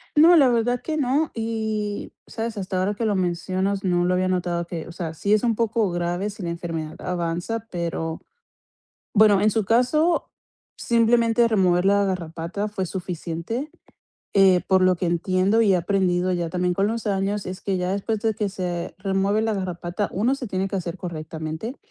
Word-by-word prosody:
No, 325 +4 +8
la 280 -6 +6
verdad 240 +1 +1
que 310 -1 -3
no. 285 +3 +1
Y, 220 -2 -3
¿sabes? 225 -1 -4
Hasta 190 -1 -2
ahora 190 +3 +1
que 230 - -2
lo 210 -2 +1
mencionas, 185 +2 -1
no, 175 -2 +2
lo 180 - +2
había 185 0 +1
notado, 175 -2 -1
que, 170 -2 -6
o - - -8
sea, 170 -2 -5
sí 200 +6 0
es 215 - +3
un 235 -2 +2
poco 225 -2 +1
grave 175 +3 -1
si 205 -1 -8
la 170 - -2
enfermedad 165 -2 -5
avanza 180 +5 -3
pero 165 -2 -3 0.9
bueno, 210 -2 +5
en 215 0 +4
su 220 -1 0
caso, 280 - +2 0.5
simplemente 235 0 +3
remover 185 -5 +3
la 200 0 +4
garrapata 175 +2 -3
fue 190 -3 -3
suficiente, 180 - -4 0.6
eh, 190 -2 +5
por 190 -1 +4
lo 185 0 +4
que 175 - -3
entiendo 185 +5 +2
y 210 -3 +4
he - - +4
aprendido 180 0 +1
ya 175 -2 -1
también 180 +1 0
con 195 +3 +1
los 225 +1 -3
años, 200 0 0
es 185 +1 -6
que 195 -2 -1
ya 180 0 -1
después, 205 +2 -2
de 220 0 0
que 210 -1 -1
se 175 -4 -4
remueve 195 +2 +1
la 220 0 0
garrapata, 185 0 -3
uno, 230 +8 +1
se 275 -2 -6
tiene 190 -2 -1
que 195 - -3
asear 175 -1 -4
correctamente, 160 - -5
195 Hz, 185 wpm, -23 LUFS, 175-220 Hz, 0.9 s, No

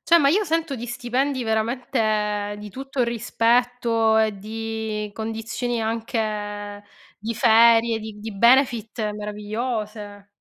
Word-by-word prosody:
Cioè 340 - +5
ma 280 -4 +4
io 400 +8 +3
sento 325 -5 -1
di 240 0 -6
stipendi 250 +3 -1
veramente 215 -2 0
di 210 0 -9
tutto 270 +3 -3
rispetto 235 -1 +1
e 215 -2 +1
di 220 0 -4
condizioni 225 +2 -3
anche 210 -2 -3 0.3
di 225 +3 -4
ferie, 230 0 +5
di 215 -1 -8
di 220 +1 -6
benefit 235 -2 +3
meravigliose. 210 0 -5
225 Hz, 115 wpm, -23 LUFS, 210-240 Hz, 0.3 s, Cioè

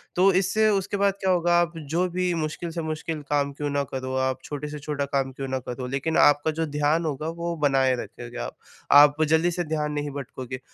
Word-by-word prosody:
तो 190 +2 +5
इससे 215 +4 +2
उसके 200 0 0
बाद 200 0 +3
क्या 190 - +1
होगा 175 -1 +2
आप 170 0 -1 0.2
जो 175 +4 +1
भी 180 0 0
मुश्किल 160 +1 -3
से 165 0 -3
मुश्किल 155 0 -4
काम 145 -1 +1
क्यों 145 +1 -3
ना 140 0 0
करो, 130 0 -3
आप 130 0 0
छोटे 150 0 -5
से 150 0 -7
छोटा 145 -1 -2
काम 135 -1 -1
क्यों 135 +1 -6
ना 130 0 -2
करो, 125 +1 -4
लेकिन 140 +5 -1
आपका 145 +2 +5
जो 160 - +1
ध्यान 150 +2 +1
होगा 150 0 -3
वो 170 0 -2
बनाए 135 -2 +3
रखोगे 120 0 -8
आप। - - -8 0.4
आप 145 +1 +7
जल्दी 160 +3 +3
से 175 +1 -2
ध्यान 150 -2 -2
नहीं 145 0 -2
भटकोगे 130 -2 -6
150 Hz, 220 wpm, -25 LUFS, 140-170 Hz, 0.4 s, आप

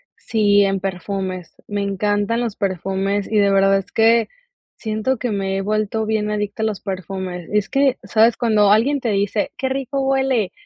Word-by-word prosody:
Sí, 205 -2 +2
en 195 -1 0
perfumes, 185 -1 -4
me 205 -1 -2
encantan 205 +3 0
los 230 -4 -3
perfumes, 195 +2 -2
y 215 - +2
de 200 -1 +4
verdad, 195 0 +4
es 195 0 -6
que 225 0 +3 0.5
siento, 220 +4 -2
que 245 +2 -3
me 195 -1 -1
he - - -1
vuelto 215 +2 -1
bien 215 -1 -1
adicta 210 +1 -3
a - - +2
los 215 -3 -3
perfumes, 185 -2 -5
es 210 -1 0
que, 275 -1 +2
¿sabes?, 225 +1 +3
cuando 215 -4 +3
alguien 255 +7 +3
te 245 - -2
dice: 205 0 0
"qué 265 - -1
rico 270 +1 -2
huele", 265 -6 +1
205 Hz, 180 wpm, -20 LUFS, 195-225 Hz, 0.5 s, de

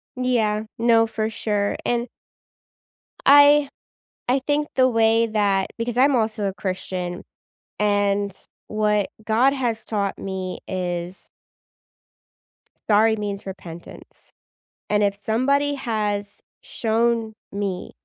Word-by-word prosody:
Yeah. 230 -4 +1
No, 230 -1 +4
for 220 0 -2
sure. 205 -2 -1
And 240 0 0 1.2
I 285 0 +7 0.6
I 260 +2 +3
think 295 +1 +1
the 255 -1 +5
way 225 -1 +3
that 200 -3 +1
because 235 +1 -3
I'm 270 +1 +4
also 220 -2 0
a 195 - -2
Christian, 185 -2 -4 0.5
and 205 -1 +1 0.4
what 210 -2 +1
God 230 +5 +3
has 240 -5 -2
taught 200 -3 -2
me 190 -1 -5
is 180 -1 -4 1.6
sorry 220 +1 +5
means 205 -2 -4
repentance. 175 -3 -11 0.6
And 210 0 +2
if 200 0 +1
somebody 280 +6 +1
has 210 -5 -3 0.2
shown 230 -1 0 0.2
me 195 -2 -4
215 Hz, 105 wpm, -23 LUFS, 200-235 Hz, 1.6 s, I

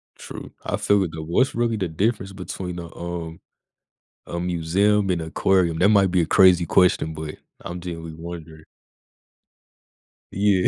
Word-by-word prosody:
True. - - -9
I - - -1
feel 100 -1 +2
it 85 - -3
though. 80 -1 -5
What's 85 +12 +1
really 115 -1 0
the 95 -3 -1
difference 95 +4 -1
between 90 -1 -6
a, 85 -1 -9
um, 85 -1 -6 0.9
a 85 - -4
museum 95 +4 +1
and 85 -2 0
aquarium? 85 0 +1
That 95 - +4
might 100 -3 +4
be 90 - +2
a - - -1
crazy 90 -1 +5
question, 85 -3 +3
but 75 -1 -6 0.2
I'm 90 +1 -6
genuinely 80 -2 -7
wondering. 80 -2 -9 1.7
Yeah. 100 -2 +2
90 Hz, 150 wpm, -23 LUFS, 80-95 Hz, 1.7 s, crazy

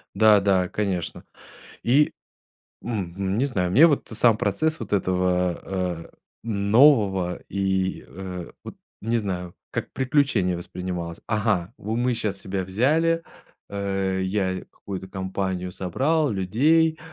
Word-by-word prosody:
Да, 110 -1 +6
да, 95 -2 +2
конечно. 95 -5 -2 0.6
И 140 +5 +4 0.7
мгм, 100 -3 -3
не 130 - +2
знаю, 95 -9 -1
мне 140 - +7
вот 145 -7 0
и - - -4
сам 115 0 +4
процесс 155 +10 0
вот - - -7
этого, 90 -2 +1
э, 90 -3 -3 0.4
нового 100 -4 +3
и, 95 -1 -1
э, 90 -2 -7
вот - - -9 0.2
не 115 +2 0
знаю, 90 -4 -4 0.2
как - - -4
приключение 130 - +1
воспринималось. 85 -1 -5
Ага, 105 -4 0
вот 110 +3 -3
мы 125 +1 +1
сейчас 105 -3 -2
себя 95 0 -3
взяли, 155 - +2 0.5
э, 95 -1 -1
я 95 -1 -1
какую-то 95 -1 -7
компанию 95 -1 -3
собрал 140 - +1
людей, 150 - +2
100 Hz, 125 wpm, -24 LUFS, 90-115 Hz, 0.7 s, мне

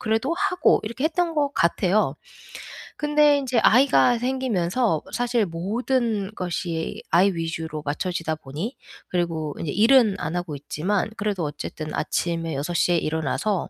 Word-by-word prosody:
그래도 225 +9 0
하고 375 -1 +2
이렇게 235 +6 -4
했던 335 +1 0
것 285 -2 +1
같아요. 180 -2 +2 0.8
근데 295 -1 +4
인제 255 -4 0
아이가 250 -1 +5
생기면서 235 - 0
사실 240 -3 +1
모든 215 +4 -1
것이 170 -2 -3
아이 185 +4 +5
위주로 165 -2 -4
맞춰지다 160 +2 -2
보니 155 - -6 0.3
그리고 165 -4 -2
이제 155 - -3
일은 225 - +5
안 175 - -3
하고 175 -4 -3
있지만 180 +9 -2
그래도 200 -4 -1
어쨌든 155 +1 -6
아침에 165 -2 -1
6 150 +6 -3
시에 175 0 +2
일어나서 160 +6 -1
195 Hz, 305 characters per minute, -24 LUFS, 165-245 Hz, 0.8 s, 아이가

